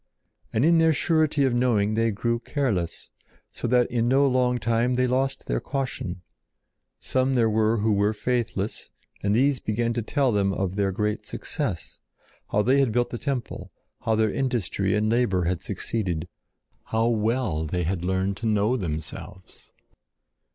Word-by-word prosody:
And 115 Hz, +6 st, +2 dB
in 165 Hz, 0 st, +5 dB
their 160 Hz, 0 st, +4 dB
surety 155 Hz, -2 st, +2 dB
of 130 Hz, -, +1 dB
knowing 115 Hz, -4 st, +2 dB
they 115 Hz, +1 st, +2 dB
grew 115 Hz, +3 st, -1 dB
careless, 115 Hz, -, -2 dB, 0.4 s
so -, -, -4 dB
that 125 Hz, +1 st, +4 dB
in 120 Hz, -1 st, +1 dB
no 135 Hz, +3 st, +4 dB
long 125 Hz, -2 st, +2 dB
time 115 Hz, +2 st, +1 dB
they 125 Hz, +1 st, +2 dB
lost 130 Hz, +2 st, -1 dB
their -, -, -1 dB
caution. 115 Hz, -10 st, -4 dB, 0.7 s
Some 130 Hz, +1 st, 0 dB
there 115 Hz, -3 st, +3 dB
were 110 Hz, +1 st, +2 dB
who 110 Hz, +1 st, +1 dB
were 100 Hz, +1 st, +2 dB
faithless, 115 Hz, -3 st, -2 dB, 0.3 s
and 100 Hz, +1 st, +1 dB
these 135 Hz, +2 st, +3 dB
began 115 Hz, +2 st, -1 dB
to 120 Hz, -, -1 dB
tell 135 Hz, +3 st, +1 dB
them 100 Hz, -2 st, +1 dB
of 95 Hz, -2 st, -2 dB
their 100 Hz, -1 st, 0 dB
great 105 Hz, +2 st, -2 dB
success; 85 Hz, -, -4 dB, 0.5 s
how 105 Hz, -, +2 dB
they 130 Hz, +4 st, +3 dB
had 135 Hz, -4 st, +2 dB
built 120 Hz, +2 st, 0 dB
the 120 Hz, -, -4 dB
temple; 135 Hz, -4 st, -4 dB, 0.3 s
how 110 Hz, -, +1 dB
their 110 Hz, -1 st, +1 dB
industry 115 Hz, -7 st, 0 dB
and 105 Hz, +1 st, +1 dB
labor 110 Hz, -6 st, +2 dB
had 85 Hz, 0 st, -1 dB
succeeded; 90 Hz, -7 st, -3 dB, 0.6 s
how 115 Hz, +1 st, +1 dB
well 110 Hz, -7 st, 0 dB
they 90 Hz, +3 st, -2 dB
had 85 Hz, +1 st, -2 dB
learned 95 Hz, +2 st, 0 dB
to 115 Hz, -, -3 dB
know 105 Hz, +3 st, +2 dB
themselves. 85 Hz, +1 st, -6 dB
115 Hz, 165 wpm, -25 LUFS, 100-125 Hz, 0.7 s, in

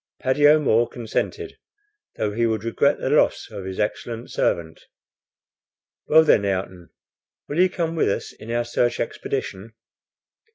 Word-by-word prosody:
Paddy 135 Hz, +3 st, +3 dB
O'Moore 135 Hz, -6 st, +4 dB
consented, 125 Hz, -, -4 dB, 0.6 s
though 105 Hz, -, -1 dB
he 115 Hz, +2 st, +1 dB
would 110 Hz, -2 st, -2 dB
regret 115 Hz, -, +1 dB
the -, -, -2 dB
loss -, -, +2 dB
of 95 Hz, -, -7 dB
his 95 Hz, 0 st, -6 dB
excellent 115 Hz, +2 st, -3 dB
servant. 80 Hz, -1 st, -1 dB, 1.3 s
"Well, 160 Hz, +1 st, +6 dB
then, 110 Hz, -9 st, +4 dB
Ayrton, 95 Hz, -3 st, -3 dB, 0.6 s
will 150 Hz, -, -3 dB
you 185 Hz, +1 st, +5 dB
come 165 Hz, -2 st, -3 dB
with 160 Hz, -, +2 dB
us 100 Hz, -, -3 dB
in 110 Hz, -, -12 dB
our 120 Hz, 0 st, -1 dB
search 120 Hz, 0 st, 0 dB
expedition?" 110 Hz, -4 st, -4 dB
115 Hz, 140 wpm, -23 LUFS, 100-145 Hz, 1.3 s, Well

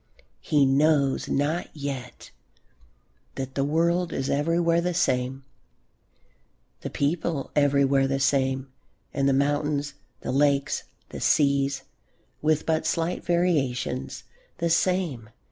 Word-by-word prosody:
He 145 Hz, -, +2 dB
knows 140 Hz, 0 st, +2 dB
not 150 Hz, +5 st, 0 dB
yet 135 Hz, -4 st, -6 dB, 1.0 s
that 130 Hz, 0 st, -5 dB
the 135 Hz, -, 0 dB
world 170 Hz, +4 st, +1 dB
is 135 Hz, -, -2 dB
everywhere 165 Hz, +3 st, +2 dB
the 180 Hz, 0 st, -1 dB
same, 130 Hz, -3 st, 0 dB, 1.3 s
the -, -, -5 dB
people 150 Hz, 0 st, -1 dB
everywhere 140 Hz, -1 st, +3 dB
the 135 Hz, 0 st, -1 dB
same, 135 Hz, 0 st, +1 dB, 0.4 s
and 140 Hz, -1 st, +1 dB
the -, -, +3 dB
mountains, 145 Hz, +1 st, 0 dB, 0.3 s
the -, -, -3 dB
lakes, 140 Hz, 0 st, +1 dB, 0.2 s
the -, -, -7 dB
seas, 140 Hz, -2 st, +2 dB, 0.6 s
with 155 Hz, 0 st, +1 dB
but 160 Hz, -1 st, 0 dB
slight 165 Hz, +2 st, -1 dB
variations, 150 Hz, -8 st, -1 dB, 0.3 s
the 170 Hz, -1 st, 0 dB
same. 165 Hz, -, 0 dB
140 Hz, 110 wpm, -25 LUFS, 135-160 Hz, 1.3 s, everywhere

